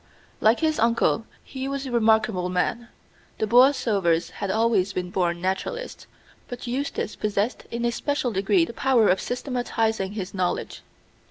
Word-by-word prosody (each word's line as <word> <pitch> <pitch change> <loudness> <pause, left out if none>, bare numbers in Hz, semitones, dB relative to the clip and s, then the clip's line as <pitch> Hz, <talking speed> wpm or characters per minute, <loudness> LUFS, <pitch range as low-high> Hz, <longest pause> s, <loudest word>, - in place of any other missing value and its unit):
Like 220 +2 +3
his 315 -1 +1
uncle, 230 0 +2 0.2
he 265 0 -6
was 275 0 -3
a 260 - -5
remarkable 220 -5 +2
man. 225 +6 -1 0.5
The - - 0
Borlsovers 220 - +3
had 200 - -5
always 210 -3 +2
been 180 -1 -3
born 175 -2 0
naturalists, 195 - -3 0.4
but 245 0 -7
Eustace 255 -2 -3
possessed 210 +2 -2
in 235 0 -3
a 240 - +2
special 275 0 -1
degree 215 - +2
the - - -9
power 250 -5 +3
of 185 - +2
systematizing 225 -5 -2
his 195 -3 -5
knowledge. 185 -2 -2
225 Hz, 150 wpm, -24 LUFS, 195-250 Hz, 0.5 s, Like